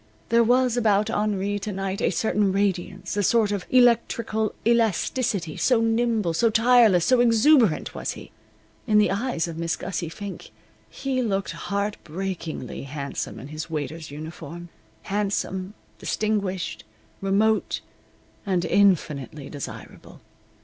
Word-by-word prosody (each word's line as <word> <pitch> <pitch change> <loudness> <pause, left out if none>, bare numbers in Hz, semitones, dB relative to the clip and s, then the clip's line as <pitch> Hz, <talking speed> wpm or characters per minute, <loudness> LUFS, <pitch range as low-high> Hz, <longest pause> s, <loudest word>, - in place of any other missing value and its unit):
There 235 0 +5
was 250 +1 +3
about 215 -2 +2
Henri 205 -1 0
to 210 - -4
night 195 0 -3
a - - +2
certain 200 +2 +1
radiance, 195 -1 -1
a 205 - +1
sort 215 +1 +3
of 200 -3 -3
electrical 230 -3 +2
elasticity, 225 -5 +1
so 250 -3 +3
nimble, 225 -5 +1
so 230 +8 +3
tireless, 225 -5 +5
so 255 -1 +4
exuberant 235 - +4
was - - -3
he. - - -12 0.6
In 215 - +4
the 210 -3 +4
eyes 200 -5 -1
of 165 -1 -6
Miss 165 -1 -1
Gussie 170 0 -4
Fink 200 +3 -8 0.4
he 265 -2 -2
looked 195 -5 -1
heartbreakingly 185 - -4
handsome 140 0 -5
in 135 - -9
his 155 +2 -6
waiter's 155 0 -4
uniform 160 +3 -8 0.3
handsome, 195 -1 -2 0.2
distinguished, 200 - -2 0.4
remote, 210 +3 +1 0.6
and 185 -4 0
infinitely 150 - +1
desirable. 145 -2 -9
200 Hz, 125 wpm, -24 LUFS, 170-225 Hz, 0.6 s, There